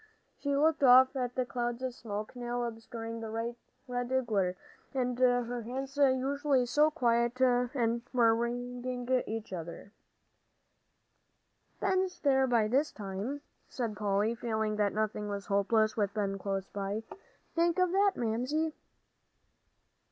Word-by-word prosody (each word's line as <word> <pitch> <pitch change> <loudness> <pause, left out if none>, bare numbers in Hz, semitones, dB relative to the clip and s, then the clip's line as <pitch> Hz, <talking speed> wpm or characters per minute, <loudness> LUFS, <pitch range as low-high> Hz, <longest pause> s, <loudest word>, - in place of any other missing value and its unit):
She 285 -1 0
looked 310 +2 +3
off 260 0 +7
at 250 -2 -2
the 255 - 0
clouds 240 0 -3
of 255 -1 -2
smoke 215 -1 -6
now 245 0 -3
obscuring 230 0 -6
the 225 -1 -5
red 245 +2 -3
glare, 195 -5 0 0.4
and 250 -1 -1
her 245 -1 +2
hands 265 +4 -5
usually 275 -1 +2
so 295 +5 +4
quiet 240 -4 +1
were 250 -1 +3 0.7
wringing 245 +1 -3 0.2
each 220 -2 -5
other. 170 +3 -7 1.9
"Ben's 375 -1 0
there 265 -2 +3
by 230 -4 +3
this 275 +7 +1
time," 205 +8 -5 0.3
said 230 -4 -3
Polly, 205 +2 +1
feeling 220 -2 -2
that 205 -1 +2
nothing 210 -1 -2
was 200 -1 -4
hopeless 215 +2 +2
with 205 -2 -1
Ben 195 -2 -1
close 195 -1 -2
by. 200 +2 -3 0.5
"Think 340 +1 +2
of 365 -1 +3
that, 395 +1 +3
Mamsie." 255 +8 -1
240 Hz, 130 wpm, -31 LUFS, 215-260 Hz, 1.9 s, off